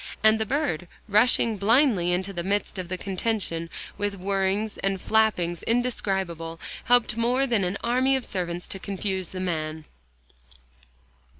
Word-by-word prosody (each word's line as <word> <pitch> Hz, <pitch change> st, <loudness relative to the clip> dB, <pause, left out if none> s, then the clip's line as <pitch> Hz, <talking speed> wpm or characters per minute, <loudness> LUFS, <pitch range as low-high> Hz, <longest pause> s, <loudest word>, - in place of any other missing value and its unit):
And 220 Hz, 0 st, +6 dB
the 220 Hz, -, -1 dB
bird, 195 Hz, -, -1 dB, 0.2 s
rushing 220 Hz, +1 st, +3 dB
blindly 210 Hz, -, +3 dB
into 185 Hz, +2 st, -1 dB
the 175 Hz, -, -3 dB
midst 200 Hz, +1 st, -1 dB
of 180 Hz, -, -4 dB
the 185 Hz, -, -2 dB
contention, 190 Hz, -4 st, -2 dB, 0.3 s
with 205 Hz, 0 st, -1 dB
whirrings 195 Hz, +2 st, 0 dB
and 195 Hz, -1 st, 0 dB
flappings 180 Hz, -6 st, +1 dB
indescribable, 190 Hz, -9 st, -1 dB, 0.3 s
helped 245 Hz, -2 st, +3 dB
more 245 Hz, +3 st, +2 dB
than 230 Hz, -6 st, +1 dB
an 180 Hz, +3 st, -1 dB
army 255 Hz, +3 st, +3 dB
of 265 Hz, -, -1 dB
servants, 175 Hz, -2 st, -3 dB
to 195 Hz, -, -6 dB
confuse 190 Hz, -2 st, -3 dB
the 185 Hz, -, -6 dB
man. 155 Hz, -3 st, -3 dB
195 Hz, 140 wpm, -26 LUFS, 180-225 Hz, 0.3 s, And